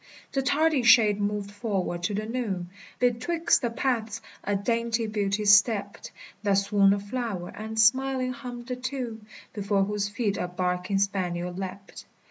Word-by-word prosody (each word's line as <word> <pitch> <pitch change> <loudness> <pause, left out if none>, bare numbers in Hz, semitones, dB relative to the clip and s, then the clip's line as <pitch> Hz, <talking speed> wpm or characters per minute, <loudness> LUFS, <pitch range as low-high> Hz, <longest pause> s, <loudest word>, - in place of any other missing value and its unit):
The 275 - 0
tardy 295 +2 +2
shade 220 -4 +5
moved 205 0 -2
forward 200 -5 -2
to 205 - -1
the 215 +1 -2
noon; 210 -7 -3 0.3
Betwixt 250 +8 +1
the 240 - 0
paths 230 -2 -1 0.2
a 205 - 0
dainty 230 +2 0
Beauty 210 -1 -1
stept, 205 0 +3 0.3
That 205 -1 +1
swung 200 0 +4
a 200 - -1
flower, 205 -4 -4
and, 220 +1 -6
smiling 255 +3 +3
hummed 245 -1 -8
a - - 0
tune, 250 -4 -5 0.3
Before 200 -1 +1
whose 205 0 -1
feet 205 -1 -1
a 180 - -2
barking 180 +2 -1
spaniel 180 -3 -1
leapt. 195 +1 -7
210 Hz, 150 wpm, -27 LUFS, 200-240 Hz, 0.3 s, shade